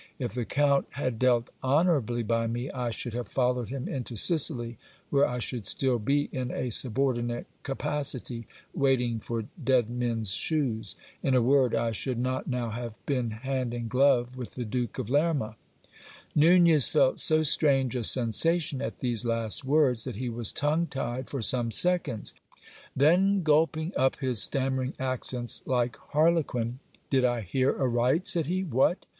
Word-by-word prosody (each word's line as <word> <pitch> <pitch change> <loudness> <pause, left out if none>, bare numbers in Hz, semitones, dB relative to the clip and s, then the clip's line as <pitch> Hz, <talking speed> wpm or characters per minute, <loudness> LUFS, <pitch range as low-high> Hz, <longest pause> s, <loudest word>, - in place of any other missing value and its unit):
If - - -4
the 120 -1 -3
count 140 +1 +1
had 130 -5 -3
dealt 120 -2 +2
honourably 135 -5 +1
by 115 +1 0
me, 120 +4 -4
I 125 -2 -3
should 115 +1 -5
have 120 0 -4
followed 125 -2 -1
him 135 0 -5
into 125 -3 -5
Sicily, 120 - +1 0.3
where 140 0 +4
I 125 - -4
should 120 -1 -4
still 130 +3 +1
be 140 +6 0
in 130 -1 -3
a 125 -1 -3
subordinate 120 0 0 0.2
capacity, 135 -4 -3 0.3
waiting 125 -4 +1
for 115 0 -4 0.2
dead 125 -3 +2
men's 115 -4 -2
shoes. 115 - -2 0.3
In 135 - +1
a 125 - +4
word, 130 -1 +3
I 115 0 0
should 125 +3 -2
not 130 +2 -2
now 125 -3 -2
have 115 0 -6
been 125 -5 -1
hand 125 +2 -3
in 120 -1 -4
glove 125 0 +2
with 125 -2 -7
the 125 - -4
Duke 120 +1 -3
of 125 -3 -4
Lerma. 145 -7 +1 0.4
( - - -21
Nunez 170 -4 +6
felt 130 - +2
so 155 0 +3
strange 135 -4 +2
a 125 - -2
sensation 135 - +2
at - - -5
these 120 -3 -1
last 115 0 -1
words, 130 -4 +2
that 125 -4 -5
he 125 +3 -4
was 115 -2 -2
tongue 155 +4 0
tied 130 -2 -4
for 135 -5 -4
some 120 0 +2
seconds. 175 - +1 0.6
Then 185 +7 +3
gulping 160 +2 +1
up 130 0 +2
his 130 -6 +1
stammering 130 -1 0
accents 130 -2 -3
like 125 -2 0
harlequin, 145 -7 0 0.3
Did 135 -2 +3
I 120 -2 +1
hear 130 +7 0
aright? 130 +5 +1
said 165 -4 +1
he. 185 +3 -1
What! 155 +2 +1
130 Hz, 165 wpm, -27 LUFS, 120-140 Hz, 0.6 s, Nunez